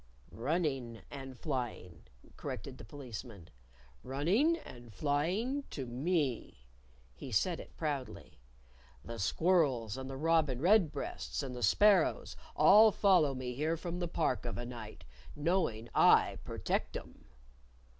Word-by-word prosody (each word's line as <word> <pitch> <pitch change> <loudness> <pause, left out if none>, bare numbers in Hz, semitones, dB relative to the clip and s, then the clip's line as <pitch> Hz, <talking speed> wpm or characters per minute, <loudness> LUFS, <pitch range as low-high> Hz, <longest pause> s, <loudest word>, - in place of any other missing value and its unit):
"Running 135 -4 -2
and 135 -2 -8
flying," 120 - -5 0.3
corrected - - -7
the - - -9
Policeman; 115 - -9 0.3
" 65 - -26 0.2
running 195 - +2
and 120 - -12
flying 170 - 0
to 135 - -5
me." 130 - -2 0.5
(He 65 - -9
said 165 - +1
it - - -12
proudly.) 145 - -4 0.7
"The 115 -1 -7
squirrels 135 - +1
and 130 0 -6
the 135 - -6
robin 155 -4 +2
redbreasts, 165 -5 +1
and 130 -2 -5
the 125 - -6
sparrows, 200 - +3 0.2
all 210 +8 +7
follow 180 -10 +3
me 125 -1 -4
here 155 +6 -1
from 175 +1 -5
the 175 - -1
Park 160 -6 -1
of 120 - -4
a 120 - -4
night, 115 -3 -9 0.3
knowing 150 - 0
I - - +5
protect - - -2
'em." - - -13
140 Hz, 130 wpm, -33 LUFS, 120-170 Hz, 0.7 s, all